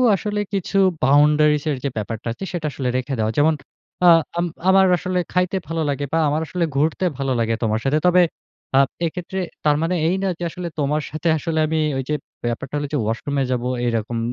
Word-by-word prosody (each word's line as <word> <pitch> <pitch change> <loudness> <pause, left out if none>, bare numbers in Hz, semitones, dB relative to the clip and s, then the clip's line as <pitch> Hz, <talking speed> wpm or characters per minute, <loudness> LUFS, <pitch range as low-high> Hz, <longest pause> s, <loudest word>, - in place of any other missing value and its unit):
আসলে 210 +1 -3
কিছু 195 0 -1 0.3
বাউন্ডারিস 150 +1 +4
এর 140 - -1
যে 140 - 0
ব্যাপারটা 110 +2 -4
আছে 195 - -9
সেটা 165 -3 -2
আসলে 130 -1 -2
রেখে 130 +2 -3
দেওয়া। 110 0 +1
যেমন 155 +2 +4 0.5
আ - - +10 0.3
আম 175 - +1 0.2
আমার 190 0 +6
আসলে 180 +1 -1
খাইতে 180 +1 +1
ভালো 165 0 -2
লাগে 145 0 -1
বা 165 - +3
আমার 150 +2 0
আসলে 175 +1 -1
ঘুরতে 155 +6 +1
ভালো 135 -1 -1
লাগে 115 0 +1
তোমার 110 -1 +1
সাথে। 140 +3 +2
তবে 180 0 +6 0.5
আ - - +7 0.3
এক্ষেত্রে 180 +3 -4 0.3
তার 150 -1 +4
মানে 165 +2 0
এই 175 - +2
না 195 - +1
যে 175 - -4
আসলে 180 0 -5
তোমার 150 +1 +1
সাথে 155 +3 -3
আসলে 160 0 -2
আমি 160 +1 0 0.2
ওই 135 - -2
যে 150 - +1 0.3
ব্যাপারটা 120 +3 -3
হলো 145 0 -2
যে - - +2
ওয়াশরুমে 135 +6 -1
যাব 125 -1 -1 0.2
এইরকম 115 0 -1
150 Hz, 200 wpm, -21 LUFS, 135-175 Hz, 0.5 s, আ